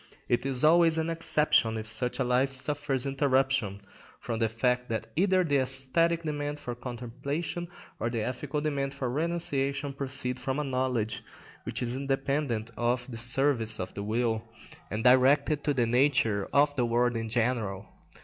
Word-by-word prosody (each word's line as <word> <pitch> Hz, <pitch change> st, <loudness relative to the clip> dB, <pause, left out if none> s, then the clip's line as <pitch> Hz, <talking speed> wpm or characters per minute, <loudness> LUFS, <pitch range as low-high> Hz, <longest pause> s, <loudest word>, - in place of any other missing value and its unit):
It 120 Hz, +3 st, 0 dB
is 130 Hz, -1 st, +4 dB
always 165 Hz, +1 st, +5 dB
an 160 Hz, +1 st, 0 dB
exception 150 Hz, -8 st, +2 dB
if 110 Hz, 0 st, -6 dB
such 120 Hz, +3 st, 0 dB
a 135 Hz, -, +1 dB
life 125 Hz, +2 st, +2 dB
suffers 135 Hz, 0 st, 0 dB
interruption 135 Hz, -6 st, +1 dB, 0.4 s
from 115 Hz, -2 st, -4 dB
the 115 Hz, -1 st, +1 dB
fact 125 Hz, +2 st, 0 dB
that 110 Hz, -1 st, -2 dB
either 185 Hz, +1 st, +3 dB
the 145 Hz, -4 st, +1 dB
æsthetic 135 Hz, +6 st, +1 dB
demand 145 Hz, -1 st, -3 dB
for 125 Hz, -, -5 dB
contemplation 135 Hz, +8 st, -5 dB, 0.3 s
or 115 Hz, -, -1 dB
the 115 Hz, -2 st, -2 dB
ethical 140 Hz, +5 st, -3 dB
demand 140 Hz, -2 st, -2 dB
for 130 Hz, -3 st, -3 dB
renunciation 145 Hz, -3 st, -1 dB
proceed 130 Hz, -2 st, -2 dB
from 130 Hz, +2 st, -2 dB
a 150 Hz, -, 0 dB
knowledge 125 Hz, -5 st, -1 dB, 0.4 s
which -, -, -3 dB
is 120 Hz, +1 st, -1 dB
independent 135 Hz, -4 st, -1 dB
of 120 Hz, +1 st, -1 dB
the 115 Hz, -, -6 dB
service 120 Hz, -2 st, +1 dB
of 90 Hz, -, -5 dB
the 100 Hz, -, -5 dB
will, 110 Hz, +1 st, -1 dB, 0.5 s
and 110 Hz, +2 st, -3 dB
directed 140 Hz, +4 st, +4 dB
to 150 Hz, -, +2 dB
the 120 Hz, -2 st, +2 dB
nature 115 Hz, -4 st, +2 dB
of 145 Hz, 0 st, +3 dB
the 125 Hz, -3 st, +1 dB
world 120 Hz, +1 st, +1 dB
in 115 Hz, -1 st, -3 dB
general. 110 Hz, -5 st, -1 dB
130 Hz, 165 wpm, -28 LUFS, 120-145 Hz, 0.5 s, always